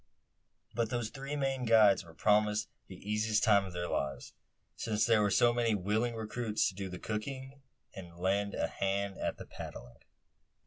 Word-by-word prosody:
But 115 -2 0
those 120 -2 -2
three 135 +2 -5
Maine 135 -2 -1
guides 110 -5 +5
were 85 -1 -15
promised 105 +3 +2 0.2
the 95 - -10
easiest 105 +1 +1
time 100 -3 +5
of 95 - -8
their 85 0 -3
lives; 70 -5 -3 0.4
since 110 -2 0
there 115 -2 +4
were 105 - +3
so 120 +4 +4
many 115 -2 +1
willing 110 +5 0
recruits 110 0 -1
to - - -10
do 95 0 -5
the 90 - -6
cooking; 130 +7 -5 0.3
and 85 -3 -10
lend 100 +3 0
a - - 0
hand 100 0 -2
at - - -2
the - - -9
paddling. 60 0 -9
105 Hz, 175 wpm, -32 LUFS, 95-115 Hz, 0.4 s, guides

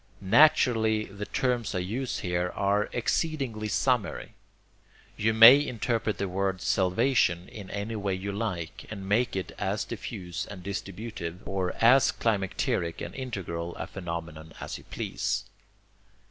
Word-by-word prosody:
Naturally 115 -6 +5
the 100 +1 -7
terms 120 -5 -1
I - - +1
use 120 +9 -3
here 90 -1 -1
are 100 +1 +1
exceedingly 120 -3 -1
summary. 125 -1 0 0.8
You 110 +2 +1
may 115 +6 +9
interpret 115 -4 -1
the 100 - -1
word 95 0 -1
'salvation' 95 -1 +2
in 100 -3 -10
any 105 +3 -4
way 100 -2 -1
you 100 +2 -4
like, 95 -6 -4
and 100 -3 -7
make 120 +4 +1
it 95 - -3
as - - -1
diffuse 90 -3 -6
and 95 -3 -9
distributive, 100 -2 -6
or 95 -2 -1
as 125 +4 +6
climacteric 95 -6 -1
and - - -6
integral 90 -10 -5
a - - -4
phenomenon 85 -3 -6
as - - -6
you - - -17
please. - - -2
100 Hz, 135 wpm, -28 LUFS, 90-115 Hz, 0.8 s, may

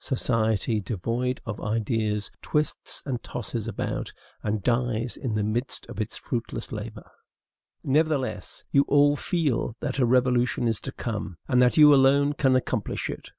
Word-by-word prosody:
Society, 110 -4 0
devoid 115 +6 -2
of 105 -2 -5
ideas, 110 -1 -1
twists 150 0 -1
and 130 -4 -3
tosses 115 -1 -5
about, 110 - -3 0.3
and 105 -2 -2
dies 120 0 0
in 120 -6 -3
the 105 - +1
midst 115 +5 -2
of - - -4
its - - -4
fruitless - - -4
labor. - - -7 0.8
Nevertheless, 145 -1 0
you 140 - +5
all 145 0 +5
feel 145 - -1
that 140 -2 -3
a 125 - +4
revolution 125 -1 +2
is 115 -2 0
to - - -5
come, 105 -6 -5
and 125 0 +3
that 125 +3 +4
you 150 -1 +9
alone 140 +1 +4
can 135 -3 +2
accomplish 130 - -1
it. - - -9
125 Hz, 150 wpm, -26 LUFS, 110-135 Hz, 0.8 s, you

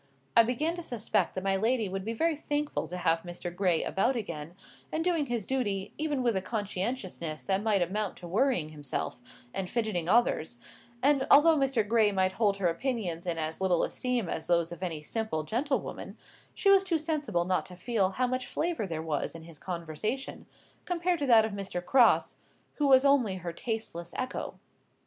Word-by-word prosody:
I - - +9
began 255 +8 0
to - - -4
suspect 240 -9 -1
that 185 - -3
my 195 0 +2
lady 225 +2 +1
would 190 0 -4
be 225 +3 -3
very 325 +7 +1
thankful 295 0 -2
to 180 - -5
have 165 -2 +2
Mr. 175 0 -6
Gray 180 -3 +2
about 245 +7 +1
again, 170 -7 -5 0.4
and 320 - -1
doing 330 -5 +1
his 235 -5 -2
duty 205 -7 -2
even 295 -4 -1
with 235 -3 +2
a 190 - +1
conscientiousness 190 -5 -3
that 195 0 0
might 210 -4 +2
amount 200 +3 -3
to 175 - -9
worrying 190 - +2
himself, 145 -4 -4 0.3
and 190 -2 -3
fidgeting 215 -8 -1
others; 220 - +2 0.5
and 275 -1 +3
although 320 +3 +7
Mr. 270 -7 +1
Gray 220 -1 +4
might 190 -1 +2
hold 200 0 +1
her 190 -3 +1
opinions 180 -3 -2
in 170 -1 -1
as 160 +2 -3
little 180 -3 +2
esteem 250 -6 -1
as 160 - -4
those 170 -1 +2
of 175 - -8
any 165 -5 -3
simple 220 -4 -2
gentlewoman, 265 - -2 0.4
she 395 - +4
was 390 -1 +6
too 355 -4 +1
sensible 290 - -1
not 185 0 0
to 180 - -11
feel 195 0 0
how 250 +7 0
much 255 0 -2
flavour 325 - -2
there 160 -2 -4
was 155 -1 -2
in 165 - -9
his 165 -2 -12
conversation, 180 - -4 0.4
compared 355 -1 0
to 285 - -1
that 225 -3 +7
of 220 - -3
Mr. 195 -3 -3
Crosse, 255 -3 +4 0.4
who 295 - +2
was 265 0 +6
only 260 -9 +4
her 175 -2 -5
tasteless 175 -5 -4
echo. 255 0 -4
210 Hz, 190 wpm, -29 LUFS, 175-260 Hz, 0.5 s, I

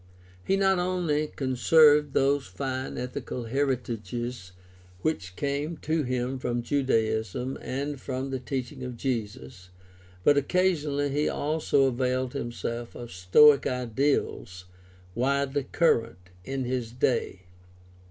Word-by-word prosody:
He 195 - +1
not 195 -1 +3
only 175 -4 0
conserved 145 +2 +4
those 140 0 +2
fine 130 -1 -4
ethical 125 0 -5
heritages 120 -4 -3 0.5
which 95 - -2
came 145 - -2
to 160 0 -1
him 130 0 -2
from 120 -1 -2
Judaism 115 -2 0
and 140 +1 -4
from 130 +1 -4
the 130 - -2
teaching 130 +1 -5
of 125 -1 -6
Jesus, 105 - -4 0.5
but 145 - +5
occasionally 145 -3 +1
he 145 +2 0
also 150 -2 +1
availed 130 0 0
himself 120 -2 -4
of 120 -1 -8
Stoic 115 +11 +5
ideals 125 -7 -1 0.5
widely 140 +3 0
current 115 - 0
in 135 +5 -3
his 125 -2 -2
day. 120 -6 0
130 Hz, 115 wpm, -27 LUFS, 120-145 Hz, 0.5 s, but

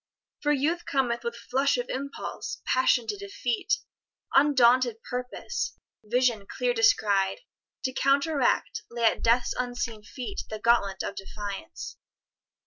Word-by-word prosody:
For 295 - +2
Youth 310 +5 0
cometh 245 -4 0
With 235 0 -3
flush 265 +3 +1
of 245 0 -2
impulse, 280 +2 -5
passion 255 -2 +3
to 415 - -2
defeat, 395 - -1 0.6
Undaunted 255 -4 +5
purpose, 250 - -4 0.3
vision 235 -2 +1
clear 250 +1 0
descried, 210 - +3 0.4
To 260 - -1
counteract, 280 0 +2
lay 235 0 -4
at 225 - +3
Death's 240 +1 +3
unseen 245 -3 -3
feet 255 - -6
The 215 - -4
gauntlet 215 -4 +2
of - - -3
defiance. 200 - -7
245 Hz, 125 wpm, -27 LUFS, 225-275 Hz, 0.6 s, Undaunted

